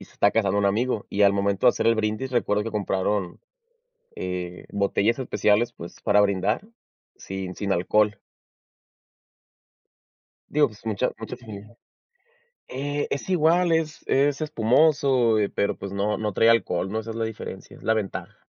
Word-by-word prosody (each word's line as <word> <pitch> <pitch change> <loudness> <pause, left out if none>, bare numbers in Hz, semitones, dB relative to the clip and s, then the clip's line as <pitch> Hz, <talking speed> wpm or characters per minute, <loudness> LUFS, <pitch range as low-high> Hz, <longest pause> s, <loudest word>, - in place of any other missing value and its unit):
y - - -10
se - - -22
está 100 - +3
casando 100 -2 +1
un 100 - +1
amigo 110 +2 0
y 100 - +1
al 100 -1 +6
momento 100 +2 +1
de - - +9
hacer 115 - 0
el 115 - +3
brindis 110 +4 -2
recuerdo 105 -4 +1
que 115 - -4
compraron, 100 -2 -1 0.8
eh, 90 -1 -5
botellas 100 +4 +1
especiales 115 -3 +1
pues 85 - -10
para 105 -1 +4
brindar 100 - 0 0.5
sin 95 -1 -6
sin 100 +1 -1
alcohol. 105 +3 +1 2.3
Digo, 150 -1 +3
pues 105 0 -17
mucha 105 -3 0
muchas 115 +3 -7
sin 110 -1 -11 0.9
eh, 145 +2 -3
es 140 - -4
igual, 175 0 +3
es 160 -1 -1
es 140 +2 +2
espumoso, 130 -3 +3
eh, 105 -2 +1
pero 100 - -1
pues 100 - -7
no, 100 +2 -1
no 105 -2 -2
trae 115 +4 +4
alcohol, 95 -5 +2
¿no? 110 - -1
Esa 110 +1 -7
es - - -7
la 115 - 0
diferencia, 110 -1 -8
es - - -17
la 110 - +2
ventaja. 105 -3 -4
110 Hz, 165 wpm, -24 LUFS, 100-125 Hz, 2.3 s, de